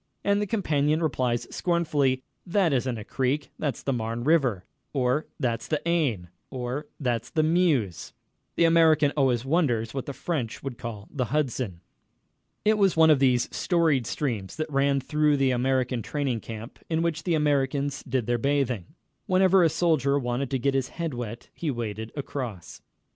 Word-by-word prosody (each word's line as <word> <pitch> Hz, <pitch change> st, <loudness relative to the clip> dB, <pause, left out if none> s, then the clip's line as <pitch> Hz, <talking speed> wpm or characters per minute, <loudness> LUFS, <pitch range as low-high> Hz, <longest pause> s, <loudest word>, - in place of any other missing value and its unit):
And 200 Hz, 0 st, +2 dB
the 210 Hz, -, -1 dB
companion 155 Hz, -6 st, +1 dB
replies 125 Hz, -5 st, 0 dB
scornfully: 145 Hz, -7 st, +1 dB, 0.2 s
"That 180 Hz, -3 st, +2 dB
isn't 125 Hz, -2 st, 0 dB
a 105 Hz, -, -6 dB
creek 135 Hz, +6 st, -1 dB
that's 145 Hz, -3 st, -2 dB
the 135 Hz, -, 0 dB
Marne 115 Hz, 0 st, -3 dB
River," 130 Hz, -, +2 dB, 0.3 s
or 130 Hz, +2 st, +1 dB
"That's 120 Hz, -5 st, -1 dB
the 155 Hz, -, 0 dB
Aisne," 140 Hz, -, 0 dB, 0.2 s
or 130 Hz, +2 st, -4 dB
"That's 120 Hz, -5 st, -1 dB
the 155 Hz, -, +1 dB
Meuse." 155 Hz, -, +1 dB, 0.4 s
The 170 Hz, -, +4 dB
American 160 Hz, -3 st, +5 dB
always 130 Hz, -4 st, +2 dB
wonders 130 Hz, -8 st, +1 dB
what 135 Hz, -2 st, -4 dB
the 140 Hz, -, -4 dB
French 135 Hz, -8 st, -3 dB
would 135 Hz, -4 st, -5 dB
call 110 Hz, -4 st, -6 dB
the 130 Hz, -3 st, -1 dB
Hudson. 125 Hz, -, -2 dB, 0.8 s
It 215 Hz, 0 st, +3 dB
was 195 Hz, -4 st, +3 dB
one 160 Hz, -1 st, +7 dB
of 150 Hz, -, +4 dB
these 125 Hz, -3 st, +3 dB
storied 160 Hz, -, +2 dB
streams 115 Hz, -7 st, -3 dB
that 155 Hz, -1 st, -4 dB
ran 140 Hz, 0 st, +2 dB
through 150 Hz, +2 st, +2 dB
the 135 Hz, -1 st, +2 dB
American 125 Hz, -1 st, 0 dB
training 135 Hz, -2 st, -2 dB
camp, 110 Hz, +2 st, -9 dB
in 165 Hz, 0 st, +1 dB
which 170 Hz, -2 st, -1 dB
the 175 Hz, -3 st, 0 dB
Americans 145 Hz, -1 st, 0 dB
did 125 Hz, -3 st, -2 dB
their 120 Hz, +1 st, 0 dB
bathing. 130 Hz, -7 st, -1 dB, 0.3 s
Whenever 185 Hz, 0 st, +5 dB
a 165 Hz, -, +5 dB
soldier 145 Hz, -4 st, +2 dB
wanted 125 Hz, 0 st, -2 dB
to 135 Hz, -, 0 dB
get 140 Hz, +2 st, 0 dB
his 135 Hz, -1 st, 0 dB
head 165 Hz, -3 st, -4 dB
wet 120 Hz, -1 st, -6 dB
he 165 Hz, -, -3 dB
waded 110 Hz, -3 st, -4 dB
across. 125 Hz, -, -6 dB
135 Hz, 170 wpm, -26 LUFS, 120-155 Hz, 0.8 s, one